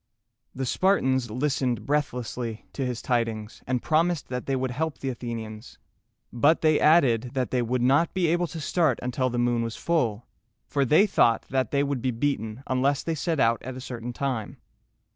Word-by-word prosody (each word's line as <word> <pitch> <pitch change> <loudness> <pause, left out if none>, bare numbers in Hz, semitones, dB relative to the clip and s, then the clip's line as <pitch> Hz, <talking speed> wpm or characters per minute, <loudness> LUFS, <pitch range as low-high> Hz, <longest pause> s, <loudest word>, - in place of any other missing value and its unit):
The 130 0 -2
Spartans 130 - +2
listened 125 -2 -1
breathlessly 125 -5 -2
to 135 - -3
his 125 -2 -3
tidings, 115 -3 -2
and 125 -1 -1
promised 165 0 +1
that 125 -1 -4
they 135 - +1
would 130 -1 -1
help 160 +4 -2
the 135 - -3
Athenians; 115 -2 -6 0.6
but 145 +7 +3
they 155 -1 +4
added, 130 -6 +3
that 130 -2 -1
they 125 - +1
would 120 +1 0
not 140 +6 +3
be 185 -2 +2
able 175 +1 +1
to 165 - -7
start 160 +2 +1
until 130 +1 0
the 120 - -3
moon 120 -1 +1
was 115 -1 -3
full, 120 -10 0 0.4
for 140 -1 0
they 155 - +5
thought 115 - +3
that 130 -3 +1
they 140 0 +1
would 140 -3 -2
be 130 - 0
beaten 115 -1 -2
unless 135 +2 +1
they 165 - -1
set 160 0 -1
out 115 -2 +3
at 130 +1 -7
a - - -6
certain 125 -2 -6
time. 125 -4 -3
130 Hz, 185 wpm, -26 LUFS, 120-145 Hz, 0.6 s, they